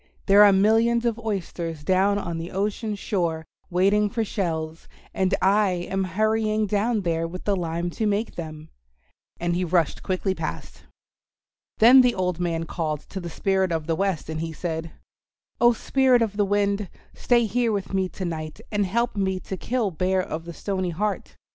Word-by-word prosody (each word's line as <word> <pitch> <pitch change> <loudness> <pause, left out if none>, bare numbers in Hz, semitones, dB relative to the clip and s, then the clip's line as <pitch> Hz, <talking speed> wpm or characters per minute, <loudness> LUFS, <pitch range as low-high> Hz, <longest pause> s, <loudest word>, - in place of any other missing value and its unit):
There 200 +1 +7
are 205 - +8
millions 225 +4 +3
of 235 -1 0
oysters 175 -7 -4
down 190 +4 +2
on 170 -5 -3
the 165 +1 -5
ocean 210 +2 -2
shore 170 -6 -2 0.2
waiting 200 +4 +3
for 225 0 -1
shells, 165 -5 -3 0.3
and 190 0 +1
I 200 +1 +4 0.2
am 190 0 0
hurrying 215 +3 +1
down 210 +2 0
there 165 -2 -1
with 180 +2 -8
the 205 - +1
lime 170 -1 -2
to 215 +5 -1
make 210 +2 -1
them," 155 -2 -8 0.7
and 175 0 0
he 180 - 0
rushed 170 -2 +1
quickly 190 0 -1
past. - - -6 0.9
Then 245 +4 +8
the 250 -1 +2
old 180 -2 -1
man 165 -2 -1
called 155 -3 -3
to 195 - -5
the 175 -2 -6
Spirit 190 +1 0
of 160 -2 -1
the 165 0 0
Wind, 190 -2 -1
and 160 0 -4
he 165 -1 -4
said, 165 0 -4 0.7
"Oh, 240 0 +6
Spirit 255 +1 +3
of 210 -3 -3
the 205 -1 +2
Wind, 200 -1 0 0.2
stay 240 -1 +2
here 235 +2 +1
with 200 -2 -3
me 190 -1 +1
to 185 - -6
night 155 -2 -5
and 205 -2 +1
help 235 +5 0
me 190 -2 0
to 190 - -5
kill 225 +1 -1
Bear 185 +3 0
of 165 -3 -5
the 170 - -7
Stony 185 0 -2
Heart. 200 +5 -3
190 Hz, 180 wpm, -24 LUFS, 170-210 Hz, 0.9 s, are